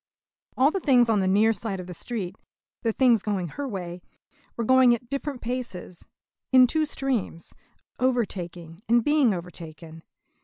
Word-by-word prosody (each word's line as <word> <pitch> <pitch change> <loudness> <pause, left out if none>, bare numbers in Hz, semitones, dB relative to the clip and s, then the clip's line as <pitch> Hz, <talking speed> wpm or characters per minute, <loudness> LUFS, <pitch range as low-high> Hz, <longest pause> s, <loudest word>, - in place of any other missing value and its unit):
All 270 +4 +4
the 390 - -2
things 245 -8 +4
on 210 - +2
the 190 - +1
near 210 +4 +4
side 210 -3 -5
of 180 - -6
the 180 - -8
street 195 -1 -5 0.5
the 230 - 0
things 240 -2 +3
going 195 -5 -2
her 285 - -5
way 180 -5 -6 0.6
were 235 - -1
going 255 0 +5
at 235 0 -12
different 275 -2 -4
paces, 230 -8 -6 0.5
in 255 -1 +8
two 310 +5 0
streams, 255 - -3 0.5
overtaking 180 -9 -2
and 235 0 +4
being 295 -4 +3
overtaken. 165 -3 -8
225 Hz, 155 wpm, -25 LUFS, 180-255 Hz, 0.6 s, in